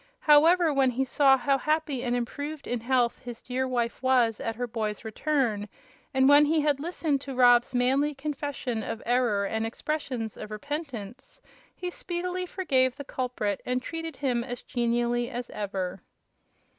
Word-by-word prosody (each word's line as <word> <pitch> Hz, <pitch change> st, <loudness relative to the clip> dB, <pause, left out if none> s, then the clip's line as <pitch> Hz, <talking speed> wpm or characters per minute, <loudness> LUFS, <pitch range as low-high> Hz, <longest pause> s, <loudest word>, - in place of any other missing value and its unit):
However, 320 Hz, +2 st, +5 dB
when 270 Hz, -2 st, +3 dB
he 260 Hz, +2 st, 0 dB
saw 270 Hz, 0 st, +4 dB
how 275 Hz, +1 st, +1 dB
happy 305 Hz, -4 st, 0 dB
and 245 Hz, -1 st, 0 dB
improved 285 Hz, +5 st, -4 dB
in 245 Hz, -, -2 dB
health 240 Hz, 0 st, +1 dB
his 240 Hz, -2 st, -8 dB
dear 260 Hz, +1 st, -2 dB
wife 240 Hz, -2 st, -2 dB
was 250 Hz, -4 st, +3 dB
at 225 Hz, -1 st, -3 dB
her 245 Hz, +2 st, -2 dB
boy's 220 Hz, -2 st, -4 dB
return, 220 Hz, -4 st, -1 dB, 0.4 s
and 265 Hz, 0 st, +3 dB
when 290 Hz, +1 st, +7 dB
he 310 Hz, +1 st, +2 dB
had 290 Hz, -2 st, +1 dB
listened 310 Hz, -3 st, -1 dB
to 275 Hz, -2 st, -6 dB
Rob's 245 Hz, 0 st, +5 dB
manly 270 Hz, +4 st, +2 dB
confession 275 Hz, -4 st, -3 dB
of 225 Hz, +1 st, -5 dB
error 235 Hz, -5 st, +2 dB
and 220 Hz, +2 st, -1 dB
expressions 245 Hz, -2 st, -3 dB
of 210 Hz, -, -7 dB
repentance, 265 Hz, -, -6 dB, 0.4 s
he 360 Hz, -1 st, -5 dB
speedily 360 Hz, +1 st, -4 dB
forgave 265 Hz, -9 st, +1 dB
the 285 Hz, -, -6 dB
culprit 245 Hz, -7 st, -2 dB
and 250 Hz, 0 st, 0 dB
treated 325 Hz, +3 st, -6 dB
him 250 Hz, -4 st, 0 dB
as 245 Hz, -1 st, -6 dB
genially 240 Hz, 0 st, 0 dB
as 245 Hz, -1 st, -6 dB
ever. 195 Hz, -3 st, -4 dB
255 Hz, 160 wpm, -27 LUFS, 235-290 Hz, 0.4 s, when